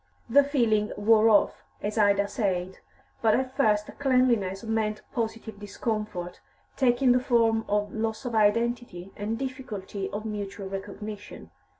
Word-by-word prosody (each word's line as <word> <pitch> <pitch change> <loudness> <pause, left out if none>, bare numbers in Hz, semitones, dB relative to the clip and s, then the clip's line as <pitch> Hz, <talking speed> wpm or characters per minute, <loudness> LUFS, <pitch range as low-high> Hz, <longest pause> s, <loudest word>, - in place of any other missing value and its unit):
The 280 +5 +6
feeling 230 -7 +1
wore 220 +1 +5
off, 210 -2 +3 0.2
as 210 +1 -2
Ida 200 -1 +3
said, 190 -3 -2 0.4
but 220 -2 +4
at 260 0 -2
first 210 -6 +2
cleanliness 245 -8 +2
meant 220 -1 -1
positive 225 -3 -4
discomfort, 210 -3 -4 0.3
taking 250 0 +3
the 250 - +4
form 230 -3 +2
of 205 -1 0
loss 220 +3 -3
of 245 - -3
identity 220 -3 +1
and 215 +2 -3
difficulty 235 -7 -5
of 210 +2 -5
mutual 205 -2 -5
recognition. 205 +2 -8
215 Hz, 130 wpm, -27 LUFS, 205-235 Hz, 0.4 s, The